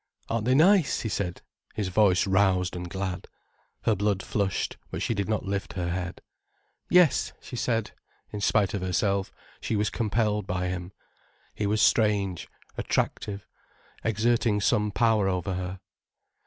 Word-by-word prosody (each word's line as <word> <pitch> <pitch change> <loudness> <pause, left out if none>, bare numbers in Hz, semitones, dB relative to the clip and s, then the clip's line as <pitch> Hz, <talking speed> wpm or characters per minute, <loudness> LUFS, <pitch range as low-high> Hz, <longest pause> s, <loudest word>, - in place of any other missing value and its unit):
"Aren't 115 -1 -1
they 130 +1 +3
nice?" 175 +1 +4
he 110 - -3
said, 90 -4 -3 0.3
his 105 -4 -1
voice 95 -1 +4
roused 95 -2 +2
and 90 0 -5
glad. 95 -1 -4 0.6
Her 110 - +3
blood 100 -1 0
flushed, 100 -3 -1
but - - -4
she - - 0
did 100 -1 -2
not 110 - -1
lift 100 0 -3
her 85 -2 -2
head. 90 0 -4 0.7
"Yes," 180 -4 +4
she - - -9
said. 115 -2 -1 0.4
In 105 - -5
spite 100 -1 +2
of 100 - -2
herself, 95 +1 0 0.3
she 110 - -2
was 105 0 0
compelled 105 -2 0
by 90 -1 -1
him. 90 0 -5 0.6
He 105 - -2
was 105 +1 +2
strange, 100 -5 +2 0.3
attractive, 100 -1 -2 0.6
exerting 110 0 +2
some 105 +1 +2
power 110 -1 +2
over 90 0 -1
her. 90 +1 -4
100 Hz, 150 wpm, -27 LUFS, 95-110 Hz, 0.7 s, nice